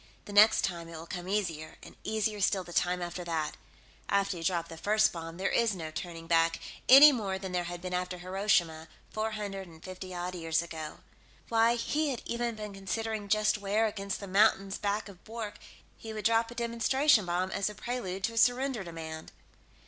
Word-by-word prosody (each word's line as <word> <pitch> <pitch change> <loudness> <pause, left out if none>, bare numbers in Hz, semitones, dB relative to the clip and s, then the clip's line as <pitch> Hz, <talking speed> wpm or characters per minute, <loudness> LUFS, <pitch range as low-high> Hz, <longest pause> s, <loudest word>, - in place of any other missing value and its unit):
The 205 - -8
next 215 +2 +6
time, 170 -3 -2
it 165 -1 -8
will 160 - -8
come 180 +1 -6
easier, 170 -6 -2
and - - -12
easier 215 -1 -1
still 190 -1 +2
the 175 -1 -11
time 180 +1 +1
after 175 +1 -5
that. 160 -3 -2 0.5
After 200 -1 +1
you 165 - -6
drop 170 -1 0
the 165 - -9
first 215 +6 +2
bomb, 165 -1 -7
there 190 +1 0
is 230 -4 +2
no 160 -3 -6
turning 165 +1 -6
back, 165 0 +2 0.3
any 280 +3 +11
more 205 -7 -2
than 190 -1 -6
there 180 -1 -1
had 175 0 -6
been 180 0 -4
after 180 0 -2
Hiroshima, 180 -3 0 0.2
four 220 0 -2
hundred 195 -3 -5
and 160 -1 -15
fifty 185 0 -8
odd 180 0 -4
years 165 -1 0
ago. 160 -2 -7 0.5
Why, 230 +1 +4
he 295 +6 0
had 255 - -4
even 235 -1 -2
been 210 -1 -7
considering 210 +2 -3
just 215 +1 +2
where, 205 +2 +1
against 200 -2 -3
the 200 - -6
mountains 195 0 +3
back 205 +1 -1
of 195 -3 -14
Bwork, 220 -2 -6 0.4
he 220 -1 -8
would 215 -1 -6
drop 230 0 +3
a 240 - -10
demonstration 235 0 +2
bomb 180 +2 0
as 200 - 0
a 210 - -9
prelude 200 -5 -4
to 230 - 0
a - - -8
surrender 245 -1 +2
demand. 160 -2 -7
195 Hz, 200 wpm, -30 LUFS, 175-220 Hz, 0.5 s, any